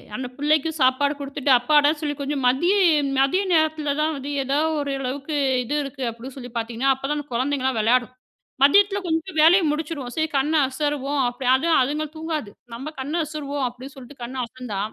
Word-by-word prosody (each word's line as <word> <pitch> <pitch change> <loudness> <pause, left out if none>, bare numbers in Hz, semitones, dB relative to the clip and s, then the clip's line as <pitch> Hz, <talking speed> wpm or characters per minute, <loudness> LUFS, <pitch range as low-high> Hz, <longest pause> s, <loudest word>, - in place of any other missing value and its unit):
அந்தப் 250 0 -6
பிள்ளைக்கு 300 +2 +1
சாப்பாடு 260 +3 +3
குடுத்துட்டு 280 0 -2
அப்பாடான்னு 295 +4 +3
சொல்லி 295 -2 -1
கொஞ்சம் 280 -1 -3
மதியம் 320 +1 +3
மதியம் 370 +9 +2
நேரத்துல 315 -2 +1
தான் 315 +1 +1
வந்து 275 +1 -6
எதோ 270 +2 0 0.2
ஒரு 285 -1 -3
அளவுக்கு 275 +3 -4 0.3
இது 245 - -4
இருக்கு 275 -1 -7
அப்டின்னு 235 +3 -9
சொல்லிப் 245 -2 -10
பாத்தீங்கன்னா, 235 +4 0
அப்ப 265 - -20
தான் 295 - 0
அந்த 290 - -8
குழந்தைங்கெல்லாம் 260 0 0
விளையாடும். 245 +3 +2 0.5
மதியத்துல 400 +7 +5
கொஞ்சம் 325 +2 -2
வேலையை 345 +4 +6
முடிச்சுருவோம்.சரி 300 -1 -3
கண்ண 285 +4 +1
அசருவோம். 285 +1 -2
அப்டி 245 +2 -5
அதுவும் 320 +5 +2
அதுங்கள் 300 +3 -2
தூங்காது. 315 -7 -4 0.2
நம்ம 270 +6 -6
கண்ண 275 +3 -4
அசருவோம் 290 -2 -4
அப்டின்னு 250 +3 -10
சொல்லிட்டு 265 0 -13
கண்ண 245 +2 -7
அசந்தா, 235 -4 -7
280 Hz, 170 wpm, -23 LUFS, 255-305 Hz, 0.5 s, வேலையை